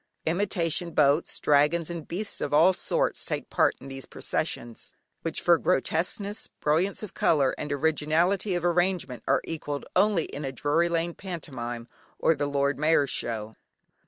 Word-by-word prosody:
Imitation 175 -1 0
boats, 150 +2 +2
dragons 150 +3 +3
and 170 -3 -6
beasts 200 +5 -3
of 145 - 0
all 170 +5 +6
sorts - - 0
take - - -4
part - - +3
in 135 - -11
these 135 0 -8
processions, 115 -1 -4 0.3
which 165 - -2
for 170 -2 +4
grotesqueness, 195 +4 -1
brilliance 170 +8 +1
of 210 - -7
colour, 140 -5 +2
and 150 - -5
originality 160 +6 +1
of 175 0 -2
arrangement 175 -6 0
are - - +3
equalled 145 -3 -5
only 195 -3 +3
in 145 - -7
a 135 - -3
Drury 150 +6 +1
Lane 170 0 -1
pantomime 125 -11 -6 0.3
or - - +3
the 145 -2 -2
Lord 140 -1 0
Mayor's 150 -2 +3
Show. 110 -1 -2
160 Hz, 155 wpm, -27 LUFS, 145-175 Hz, 0.3 s, all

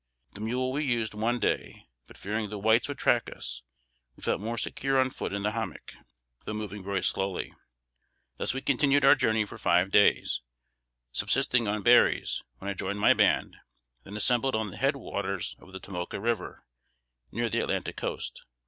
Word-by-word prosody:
The 100 - -9
mule 125 +4 -1
we 145 +3 -1
used 120 -6 0
one 115 +3 0
day; - - -2 0.2
but - - -15
fearing 105 +1 -3
the 105 - -5
whites 110 +3 +3
would 145 - -5
track 120 - +2
us, - - -5 0.5
we - - -16
felt - - 0
more 115 +2 -3
secure 135 +3 0
on 130 0 +2
foot - - -4
in 100 0 -3
the 105 - +1
hommock, 115 0 -5 0.5
though 105 - -4
moving 105 -2 -5
very 95 -1 -2
slowly. 95 -1 -1 0.8
Thus - - 0
we 135 - -3
continued 140 +1 +3
our - - +9
journey 110 -6 +2
for - - -10
five 90 +3 +3
days, 105 - +4 0.7
subsisting 120 - +1
on 105 0 -1
berries, 120 0 +4 0.2
when 95 - -8
I 100 - 0
joined 100 +1 -3
my 105 - +6
band, - - +2 0.5
then 100 +7 -8
assembled 125 +3 +2
on 110 -3 -1
the - - -8
head 135 +2 +2
waters 100 -7 -3
of 95 - -16
the 95 - -7
Tomoka 90 -1 -5
River, 115 -2 -2 0.7
near 120 +2 -1
the 110 - 0
Atlantic - - -2
coast. - - -4
110 Hz, 180 wpm, -28 LUFS, 100-120 Hz, 0.8 s, our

